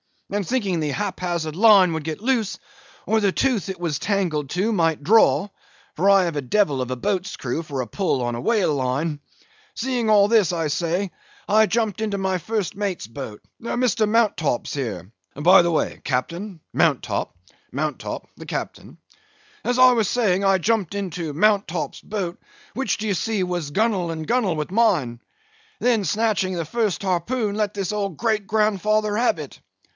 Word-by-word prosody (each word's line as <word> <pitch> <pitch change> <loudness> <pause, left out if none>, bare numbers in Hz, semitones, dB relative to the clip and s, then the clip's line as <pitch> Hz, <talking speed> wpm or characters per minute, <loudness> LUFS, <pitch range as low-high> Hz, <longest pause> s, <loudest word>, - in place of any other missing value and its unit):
And 200 -3 -2
thinking 205 -9 0
the 150 -2 -1
hap 200 +3 -3
hazard 170 -3 -3
line 200 -4 +6
would 160 -2 -4
get 160 +3 -4
loose, 230 -4 0 0.5
or 220 - +2
the 200 -3 +1
tooth 250 -9 0
it 190 -2 -5
was 160 -6 -1
tangled 175 -9 -1
to 195 +6 0
might 165 -7 +1
draw 195 -2 +4 0.5
(for 190 +5 +2
I 195 -1 +6
have 170 -4 -2
a - - 0
devil 140 -1 +1
of 125 - -3
a 130 - -2
boat's 185 +7 -2
crew 130 +5 -3
for 145 -5 -4
a 125 - -5
pull 180 -10 -1
on 120 0 -1
a 120 - -4
whale 215 -9 +2
line); 140 +3 -1 0.6
seeing 245 -2 -1
all 205 -1 +5
this, 215 -6 +3
I 165 -3 -1
say, 170 +5 -1 0.4
I 220 +1 +5
jumped 220 -2 -1
into 210 -2 -1
my 190 -1 0
first 210 +1 -2
mate's 200 - -3
boat—Mr. 215 - -2
Mounttop's 210 - +1
here 105 - -4 0.2
(by 175 +6 +6
the 170 - +1
way, 160 - -1
Captain—Mounttop; 165 - -1 0.4
Mounttop—the 150 +3 -5
captain);—as 425 -12 -7
I 255 0 +8
was 225 -4 +2
saying, 200 -5 +1
I 195 -1 +4
jumped 200 -1 0
into 175 -6 -4
Mounttop's 195 -2 +1
boat, 190 -5 -4 0.3
which, 265 -4 -1
d'ye 215 -1 -2
see, 200 +2 0
was 175 -4 -3
gunwale 195 -2 +1
and 160 -1 -5
gunwale 215 -4 +1
with 150 +2 -4
mine, 180 - +2 0.6
then; 240 -2 +3
and 195 - -3
snatching 205 0 +1
the 165 -2 -2
first 215 +1 -1
harpoon, 200 +4 -1
let 210 -1 -1
this 195 -2 -2
old 200 -4 -2
great 215 -4 0
grandfather 215 0 +1
have 240 +2 +2
it. - - -9
195 Hz, 170 wpm, -23 LUFS, 160-215 Hz, 0.6 s, I